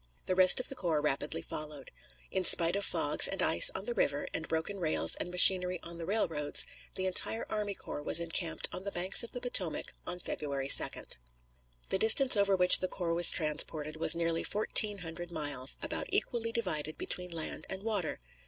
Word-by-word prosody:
The - - -2
rest 185 +3 +6
of 255 - -4
the - - -5
corps 170 - -3
rapidly 145 0 -4
followed. 150 -1 -10 0.4
In 190 - -3
spite 170 0 +6
of 200 - -4
fogs - - +4
and - - -6
ice - - +6
on - - -4
the 485 - -4
river, - - -2
and - - -5
broken 165 +5 -5
rails 160 -3 0
and - - -6
machinery 180 0 +5
on 170 0 -9
the 165 - -8
railroads, 160 -8 -1 0.3
the 190 - -5
entire 190 +4 -1
army 210 -2 -5
corps 145 - -9
was 155 - +5
encamped 170 0 -1
on 185 - -6
the 200 - -6
banks 185 +1 +3
of 235 - -8
the 245 - -7
Potomac 190 -10 -1
on 180 - -5
February 140 -5 -6
2d. - - +3 0.7
The 190 - -2
distance 255 +5 +5
over 200 -1 0
which 180 -1 +6
the 185 - -2
corps 175 -3 -5
was 170 +1 +4
transported 155 -1 -1
was 160 - +1
nearly 165 0 -3
fourteen 210 0 -1
hundred 175 +2 -9
miles, 145 -5 -4
about - - -5
equally 230 -1 -3
divided 155 -10 -3
between 180 0 -2
land 165 -2 -6
and 190 +1 -7
water. 205 -7 -4
180 Hz, 190 wpm, -29 LUFS, 160-200 Hz, 0.7 s, rest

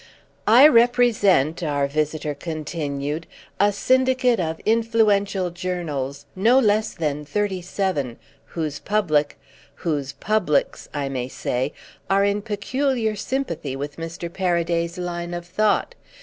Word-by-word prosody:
"I 245 +7 +9
represent," 230 - +4
our 145 -4 0
visitor 150 +1 -1
continued, 150 -1 -4 0.3
"a 205 +1 +4
syndicate 255 +2 +2
of 160 -2 -2
influential 210 -4 +2
journals, 155 -7 -4
no 230 +7 +4
less 215 -3 +2
than 150 -3 -2
thirty 190 +4 -1
seven, 175 - -2 0.3
whose 155 -4 -4
public—whose 150 -5 -2
publics, 215 -9 0
I 145 -2 -2
may 130 -2 -3
say—are 145 +10 -2
in 200 +1 +1
peculiar 225 +2 -1
sympathy 205 - -3
with 140 +1 -6
Mr. 165 +1 -5
Paraday's 170 -2 0
line 175 -1 -4
of 175 0 -6
thought. 210 +4 +1
175 Hz, 110 wpm, -23 LUFS, 150-210 Hz, 0.3 s, I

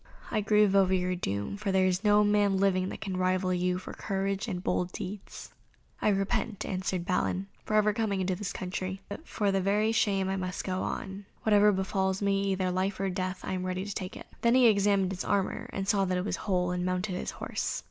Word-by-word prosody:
I 215 - +1
grieve 210 -1 +4
over 190 -1 +4
your 180 0 0
doom, 100 - -3
for 205 -1 -2
there 190 0 +3
is 185 +2 +1
no 210 0 +5
man 205 -1 +3
living 190 -1 +2
that - - -7
can 190 -3 -3
rival 185 0 +1
you 180 0 +1
for 185 - -8
courage 195 +2 -2
and 180 -4 -4
bold 180 0 0
deeds." 195 +2 -7 0.5
"I - - +3
repent," 195 +1 0
answered 185 -1 -2
Balin, 185 +1 0 0.2
"ever 215 - +1
having - - +1
come 220 -1 -1
into 190 -1 0
this 195 +1 -4
country, 185 +1 -4
but 320 - -8
for 205 -2 0
very 200 +3 +2
shame 195 -4 +2
I 190 0 -1
must 185 -1 -3
go 185 -1 -2
on. 195 0 -5 0.2
Whatever 210 -1 +5
befalls 190 0 0
me, 200 -1 +1
either 190 0 -1
for 180 - +1
life 185 +1 -1
or 195 -1 0
death, 185 0 -3
I - - -3
am 185 -1 -2
ready 185 +1 -2
to 205 - -4
take 185 -1 -5
it." - - -10 0.2
Then 235 +1 +4
he 255 -1 +6
examined 200 -3 +4
his 185 - -4
armour, 200 -2 -1
and 195 0 -3
saw 200 -2 +3
that 185 -1 0
it 180 - -2
was - - -1
whole, 180 -2 +1
and 180 0 -1
mounted 185 +2 -1
his 180 - -3
horse. - - -2
190 Hz, 225 wpm, -29 LUFS, 185-200 Hz, 0.5 s, he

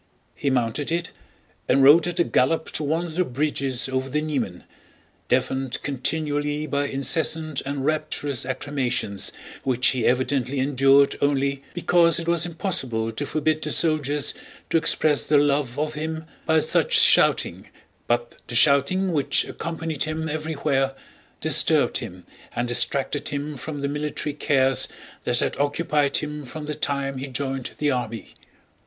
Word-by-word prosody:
He 140 - -2
mounted 130 +3 -1
it 170 +1 -2 0.6
and 135 - +4
rode 155 +5 +7
at 175 0 -3
a - - +5
gallop 160 +2 +1
to 155 - -2
one 160 +4 0
of 165 - -7
the 180 +3 +1
bridges 135 -3 -1
over 130 0 -2
the 150 +3 0
Niemen, 125 - -3 0.6
deafened 130 -1 0
continually 145 +2 -1
by 145 -1 -1
incessant 155 +2 0
and 140 -1 -3
rapturous 145 -3 -1
acclamations 130 -5 -2 0.3
which 130 -1 +2
he 125 -4 0
evidently 130 +1 0
endured 135 +1 +4
only 140 -1 +1
because 170 -2 +3
it 170 - -4
was 170 0 +2
impossible 135 - -2
to 140 +6 -5
forbid 155 0 0
the - - -3
soldiers 150 -3 +1 0.4
to - - +4
express 155 -2 +2
their 150 - +4
love 145 -3 +1
of 155 +1 -1
him 160 +1 -4 0.2
by 160 -1 +4
such - - +2
shouting, - - +4 0.4
but 120 0 -1
the 120 - -4
shouting 145 +9 +4
which 145 -3 +1
accompanied 165 -3 -3
him 155 +1 -3
everywhere 150 -3 -1 0.5
disturbed - - +3
him 90 0 -9 0.3
and 120 +1 -1
distracted 135 +4 0
him 145 0 -4
from 145 +2 -6
the 140 - -1
military 150 0 -3
cares 135 -3 +2 0.4
that 120 0 +1
had - - -1
occupied 145 0 +1
him 150 0 -4
from 150 +4 -8
the 150 - -3
time 140 -2 -2
he 135 - -5
joined 135 0 -3
the 150 -1 +1
army. 120 -3 -4
145 Hz, 150 wpm, -23 LUFS, 130-155 Hz, 0.6 s, rode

